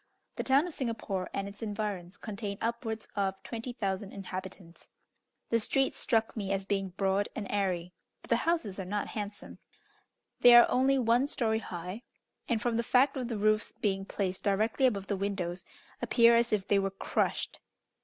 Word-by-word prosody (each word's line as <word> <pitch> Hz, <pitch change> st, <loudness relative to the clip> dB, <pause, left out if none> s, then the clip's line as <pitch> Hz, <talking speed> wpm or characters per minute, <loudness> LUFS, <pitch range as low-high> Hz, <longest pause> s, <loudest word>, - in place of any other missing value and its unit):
The -, -, -1 dB
town 275 Hz, +4 st, +4 dB
of 350 Hz, -, -6 dB
Singapore 220 Hz, -8 st, -3 dB
and 200 Hz, -, -3 dB
its 200 Hz, +1 st, -11 dB
environs 205 Hz, -4 st, -4 dB
contain 200 Hz, -2 st, -5 dB
upwards 225 Hz, -1 st, -3 dB
of 195 Hz, -2 st, 0 dB
20,000 215 Hz, -5 st, -4 dB
inhabitants. 185 Hz, -2 st, -8 dB, 0.6 s
The 230 Hz, -, +4 dB
streets 270 Hz, +4 st, 0 dB
struck 225 Hz, -2 st, +1 dB
me 200 Hz, -3 st, -3 dB
as 195 Hz, 0 st, -1 dB
being 195 Hz, -1 st, -1 dB
broad 195 Hz, +2 st, 0 dB
and 210 Hz, -, -3 dB
airy, 180 Hz, -3 st, -1 dB, 0.3 s
but -, -, -14 dB
the -, -, +5 dB
houses 320 Hz, -, -1 dB
are -, -, -2 dB
not 205 Hz, +3 st, -2 dB
handsome. 205 Hz, -1 st, -6 dB, 0.8 s
They 245 Hz, -1 st, +9 dB
are 240 Hz, -, +10 dB
only 265 Hz, +2 st, +3 dB
one 245 Hz, +2 st, +3 dB
story 220 Hz, -6 st, 0 dB
high; 180 Hz, +2 st, -6 dB, 0.5 s
and, 235 Hz, -3 st, +2 dB
from 230 Hz, +1 st, 0 dB
the -, -, +2 dB
fact 255 Hz, +4 st, +3 dB
of 255 Hz, -3 st, -2 dB
the 230 Hz, -3 st, -3 dB
roof's 215 Hz, +1 st, +2 dB
being 195 Hz, -2 st, -1 dB
placed 190 Hz, -2 st, -2 dB
directly 220 Hz, +6 st, +2 dB
above 200 Hz, -6 st, -1 dB
the 200 Hz, -, -1 dB
windows, 190 Hz, -2 st, -3 dB, 0.4 s
appear 235 Hz, -1 st, +5 dB
as 235 Hz, 0 st, +3 dB
if 205 Hz, -3 st, 0 dB
they 200 Hz, -, +4 dB
were 195 Hz, 0 st, 0 dB
crushed. 195 Hz, -, -1 dB
205 Hz, 175 wpm, -30 LUFS, 195-235 Hz, 0.8 s, are